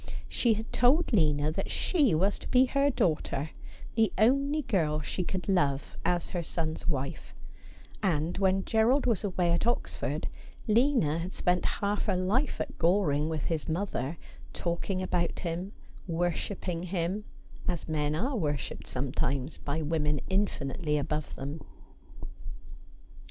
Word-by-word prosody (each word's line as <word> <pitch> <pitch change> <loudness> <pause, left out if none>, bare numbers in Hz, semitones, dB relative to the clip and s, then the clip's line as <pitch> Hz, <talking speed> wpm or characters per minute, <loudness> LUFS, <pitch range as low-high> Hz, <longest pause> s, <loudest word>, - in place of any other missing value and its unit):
She 235 -3 +2
had 220 +2 -6
told 265 +5 +4
Lina 150 -5 +3
that - - -3
she 290 - +2
was 195 +5 +2
to - - -8
be 255 +1 +5
her 275 +2 +2
daughter, 155 - 0 0.4
the 225 -1 +3
only 275 +6 +3
girl 155 -10 +1
she 180 - -2
could 180 +1 -3
love 145 -8 +1
as 175 -1 0
her 175 - -1
son's 160 0 -3
wife; 140 -4 -3 0.7
and 170 -4 +1
when 190 -1 +2
Gerald 230 +5 +3
was 230 -5 +1
away 180 -3 +1
at 170 +6 +1
Oxford, 240 - -1 0.4
Lina 225 - +3
had 180 +3 -4
spent 180 0 +1 0.2
half 205 +1 +1
her 185 - +1
life 210 +11 +1
at - - -4
Goring 165 -4 +3
with 160 -2 -2
his 165 -1 -2
mother, 160 -4 -2 0.4
talk 170 +2 -3
ing 185 -1 0
about 175 -2 -1
him, 175 +3 -3 0.4
worshipping 175 +1 -1
him, 180 +3 -2 0.4
as 175 -3 -2
men 150 -1 0
are 255 - -1
worshipped 150 - -2
some 130 0 -2
times 140 +1 -1
by 155 +2 -2
women 150 -1 +1
infinitely 160 -5 0
above 150 +1 -2
them. 145 +3 -5
175 Hz, 145 wpm, -29 LUFS, 155-205 Hz, 0.7 s, be